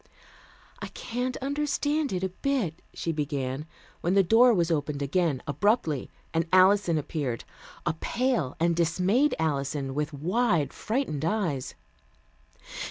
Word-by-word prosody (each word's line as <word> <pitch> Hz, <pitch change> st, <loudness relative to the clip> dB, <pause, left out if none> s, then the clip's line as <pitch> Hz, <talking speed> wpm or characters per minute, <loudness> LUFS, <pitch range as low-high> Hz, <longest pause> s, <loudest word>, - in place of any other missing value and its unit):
"I -, -, -5 dB
can't 250 Hz, +2 st, -4 dB
understand 290 Hz, +1 st, 0 dB
it 185 Hz, 0 st, -2 dB
a 190 Hz, -, 0 dB
bit," 190 Hz, -, -2 dB
she 165 Hz, -, -3 dB
began, 145 Hz, -2 st, -3 dB, 0.3 s
when 175 Hz, +3 st, +1 dB
the 195 Hz, -, +6 dB
door 230 Hz, +7 st, +6 dB
was 175 Hz, -6 st, +2 dB
opened 145 Hz, -2 st, -1 dB
again 145 Hz, -2 st, 0 dB
abruptly, 160 Hz, -, +1 dB, 0.2 s
and 165 Hz, 0 st, +1 dB
Alison 185 Hz, -2 st, +5 dB
appeared 140 Hz, -5 st, -3 dB, 0.4 s
a 170 Hz, -, +1 dB
pale 230 Hz, -, -1 dB
and 170 Hz, +1 st, +2 dB
dismayed 180 Hz, -, +2 dB
Alison 140 Hz, -3 st, -1 dB
with 150 Hz, +2 st, -2 dB
wide 170 Hz, -, +1 dB
frightened 220 Hz, -, -2 dB
eyes. 165 Hz, -8 st, -1 dB
170 Hz, 125 wpm, -27 LUFS, 150-225 Hz, 0.4 s, the